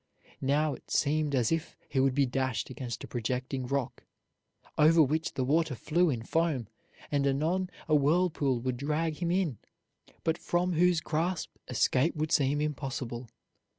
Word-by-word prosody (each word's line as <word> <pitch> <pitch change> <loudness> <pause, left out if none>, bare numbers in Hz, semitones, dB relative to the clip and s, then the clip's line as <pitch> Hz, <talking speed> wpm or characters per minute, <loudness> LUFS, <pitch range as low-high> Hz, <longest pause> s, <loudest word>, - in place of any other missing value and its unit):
Now 145 +2 +2
it - - -12
seemed 150 0 +1
as 120 -4 +2
if 165 -1 -2
he 135 - -1
would 130 -1 +3
be 140 -1 +4
dashed 130 0 -2
against 120 -1 -5
a - - -7
projecting 125 +2 -3
rock, 140 -1 -2 0.7
over 160 +2 +5
which 155 +3 -1
the 130 - 0
water 155 +1 +1
flew 170 +8 +2
in 120 -5 -2
foam, 155 - 0 0.4
and 140 -1 +2
anon 165 +7 0 0.2
a 155 - +1
whirlpool 150 -3 +2
would 130 0 -2
drag 150 +3 -1
him 170 -1 -1
in, 175 - 0 0.8
from 175 +1 0
whose 175 0 +3
grasp 165 +3 -1 0.2
escape 130 +5 +2
would 155 +1 -2
seem 145 0 +2
impossible. 130 -5 -4
145 Hz, 150 wpm, -30 LUFS, 130-160 Hz, 0.8 s, over